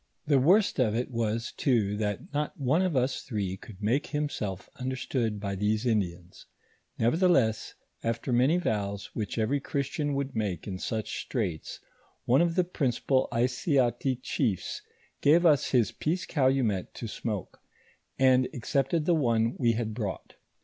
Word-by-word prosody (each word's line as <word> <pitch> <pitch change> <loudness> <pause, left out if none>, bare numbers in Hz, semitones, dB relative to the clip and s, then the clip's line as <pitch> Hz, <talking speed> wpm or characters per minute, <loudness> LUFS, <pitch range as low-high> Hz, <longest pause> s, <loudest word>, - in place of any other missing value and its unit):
The 140 -2 +4
worst 185 +6 +4
of 110 -4 +2
it 125 +3 -2
was, 115 0 -1
too, 110 -7 +1
that 105 +4 -3
not 150 +4 -2
one 140 +6 +2
of 185 -5 0
us 130 +1 +1
three 100 -7 -3
could 105 -2 -12
make 125 +8 +1
himself 125 - -3
underatood 125 -4 -2
by 100 -1 -3
thesd 105 +4 0
Indians; 90 -6 -2 0.5
nevertheless, 130 - +2 0.3
after 115 +2 -1
many 130 +8 +4
vows, 100 - -2
which 105 0 -4
every 115 +6 +1
Chris 140 0 -2
tian 145 -1 -2
would 140 -2 -3
make 100 -7 -2
in 95 -3 -5
such 110 +2 -3
straits, 95 - -3 0.5
one 130 +5 +4
of 170 -1 +1
the 180 - +4
principal 135 -5 0
Issati 125 +1 +1
chiefs 110 - -1 0.4
gave 165 +5 +5
us 150 -4 +4
his 120 -4 +3
peace 170 +5 -2
calumet 130 - +1
to 115 - -5
smoke, 105 -3 -5 0.6
and 130 -1 +4
accepted 140 +6 0
the 175 - +3
one 115 -6 +2
we 120 -2 +3
had 110 -1 -2
brought. 105 -4 -5
125 Hz, 150 wpm, -28 LUFS, 110-140 Hz, 0.6 s, gave